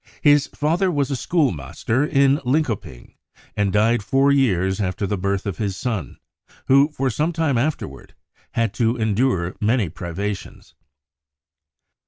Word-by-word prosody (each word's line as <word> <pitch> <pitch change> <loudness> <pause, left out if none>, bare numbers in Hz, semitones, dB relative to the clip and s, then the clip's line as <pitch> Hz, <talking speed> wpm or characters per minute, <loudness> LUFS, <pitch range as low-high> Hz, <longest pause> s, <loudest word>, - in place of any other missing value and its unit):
His 145 -1 +5
father 170 +6 0
was 145 -4 0
a - - 0
schoolmaster 120 - 0
in 140 -2 +3
Linkoping, 125 - -2 0.4
and 100 -1 +1
died 110 +3 +2
four 135 +7 +2
years 95 -8 +2
after 100 +2 -2
the 105 - -1
birth 100 0 -2
of 100 -3 -4
his 100 -4 -2
son, 110 -4 -4 0.5
who 140 +3 +5
for 135 -3 -1
some 155 +8 0
time 160 -5 0
afterward 120 - -3 0.4
had 115 -3 0
to 115 +1 +1
endure 110 -5 0
many 110 -3 +1
privations. 95 +5 -6
115 Hz, 135 wpm, -21 LUFS, 100-140 Hz, 0.5 s, His